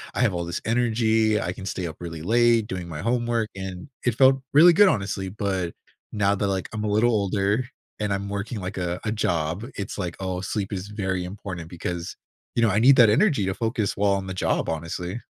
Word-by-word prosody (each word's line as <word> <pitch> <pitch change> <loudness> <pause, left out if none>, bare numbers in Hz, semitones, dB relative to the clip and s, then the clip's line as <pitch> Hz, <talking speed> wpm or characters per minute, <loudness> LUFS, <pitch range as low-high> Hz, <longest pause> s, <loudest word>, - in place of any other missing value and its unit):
I - - 0
have 115 -6 +3
all 85 -1 -2
this 85 0 -4
energy. 110 -2 +2
I 90 - -2
can 95 0 -8
stay 90 0 -3
up 80 -2 -6
really 80 -2 -7
late 115 +2 +3
doing 90 -3 -5
my 80 -3 -6
homework," 115 0 0
and 95 0 -6 0.2
it 120 -3 +1
felt 130 +1 +5
really 170 +5 +8
good, 205 +4 +7
honestly, 100 - -1
but 95 -3 -2 0.4
now 100 -1 +2
that, 100 0 -1
like, 95 -2 -1
I'm 110 -1 -3
a - - -1
little 110 +4 +3
older 100 +2 +1 0.3
and 105 -1 -1
I'm 100 0 -2
working, 100 +3 -4
like, 95 +1 -5
a 90 -1 -2
a 110 - 0
job, 85 0 -1
it's 100 +1 -5
like, 90 -3 -3
"Oh, 95 -1 -3
sleep 100 +1 -3
is 95 0 -4
very 95 -3 -2
important," 90 -3 -7
because, 85 0 -5 0.4
you 115 - +2
know, 110 - +4
I 100 - +2
need 130 +4 +7
that 120 -4 +7
energy 140 - +3
to 95 - -1
focus 115 -1 -1
while 100 0 +2
on 95 -1 -2
the 95 - -4
job, 90 - 0
honestly. 85 +6 -4
100 Hz, 220 wpm, -24 LUFS, 90-115 Hz, 0.4 s, really